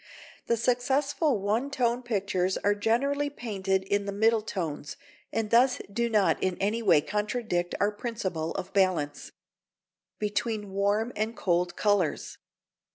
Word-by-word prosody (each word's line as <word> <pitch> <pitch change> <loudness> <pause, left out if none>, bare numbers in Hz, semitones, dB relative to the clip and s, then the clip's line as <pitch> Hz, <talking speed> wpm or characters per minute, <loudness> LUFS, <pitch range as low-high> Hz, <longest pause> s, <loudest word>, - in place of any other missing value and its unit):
The 235 - +2
successful 270 +4 +1
one 215 +7 0
tone 245 -3 0
pictures 195 -5 -1
are 205 - +2
generally 275 +8 +1
painted 195 -8 -2
in 200 +1 0
the - - -1
middle 220 +2 +3
tones, 165 -8 -4 0.3
and 220 -2 -2
thus 250 +3 +5 0.2
do 235 +2 0
not 210 -4 +2
in 185 -1 0
any 210 +4 0
way 190 -9 +5
contradict 210 -1 -2
our 205 +1 +2
principle 195 -7 -3
of 190 - -5
balance. 180 -7 +1
[Sidenote: - - -16 0.8
Between 210 0 -2
Warm 205 +4 0
and 220 +2 -2
Cold 175 -1 0
Colours. 205 -7 0
210 Hz, 140 wpm, -28 LUFS, 190-235 Hz, 0.8 s, thus